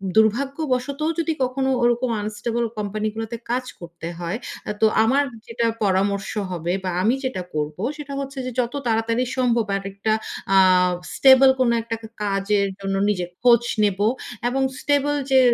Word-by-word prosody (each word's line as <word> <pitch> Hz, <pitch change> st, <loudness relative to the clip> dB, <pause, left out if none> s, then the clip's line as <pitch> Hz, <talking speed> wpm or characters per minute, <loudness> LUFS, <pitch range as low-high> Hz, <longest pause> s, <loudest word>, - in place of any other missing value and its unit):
দুর্ভাগ্যবশতও 270 Hz, +5 st, +1 dB
যদি 330 Hz, -1 st, 0 dB
কখনো 265 Hz, +1 st, 0 dB
ওরকম 240 Hz, +1 st, +2 dB
আনস্টেবল 225 Hz, +3 st, -2 dB
কোম্পানি 210 Hz, +1 st, -2 dB
গুলোতে 225 Hz, +1 st, -4 dB
কাজ 255 Hz, +1 st, 0 dB
করতে 170 Hz, -1 st, -8 dB
হয়, 175 Hz, +4 st, -3 dB, 0.3 s
আ -, -, +1 dB
তো -, -, +6 dB, 0.2 s
আমার 265 Hz, +6 st, +3 dB, 0.2 s
যেটা 230 Hz, 0 st, -1 dB, 0.2 s
পরামর্শ 195 Hz, 0 st, +1 dB, 0.2 s
হবে 175 Hz, 0 st, -2 dB
বা 185 Hz, -, -1 dB
আমি 230 Hz, +6 st, +3 dB
যেটা 260 Hz, -8 st, -2 dB
করব 150 Hz, 0 st, -2 dB, 0.2 s
সেটা 290 Hz, -2 st, -7 dB
হচ্ছে 275 Hz, 0 st, -6 dB
যে 255 Hz, -, -3 dB
যত 240 Hz, -1 st, 0 dB
তাড়াতাড়ি 230 Hz, +2 st, +1 dB
সম্ভব 240 Hz, -3 st, +2 dB
আরেকটা 195 Hz, +2 st, -2 dB, 0.4 s
আ -, -, +7 dB, 0.6 s
স্টেবল 265 Hz, 0 st, +7 dB
কোনো 245 Hz, -2 st, +3 dB
একটা 230 Hz, 0 st, -4 dB, 0.3 s
কাজের 200 Hz, 0 st, +1 dB
জন্য 195 Hz, 0 st, -2 dB
নিজের 180 Hz, -4 st, -1 dB
খোঁজ 240 Hz, -1 st, +5 dB, 0.2 s
নেব, 200 Hz, -2 st, +1 dB, 0.5 s
এবং 265 Hz, +2 st, 0 dB, 0.2 s
স্টেবল 290 Hz, 0 st, +1 dB, 0.2 s
যে 265 Hz, -, +7 dB
230 Hz, 150 wpm, -22 LUFS, 200-260 Hz, 0.6 s, আ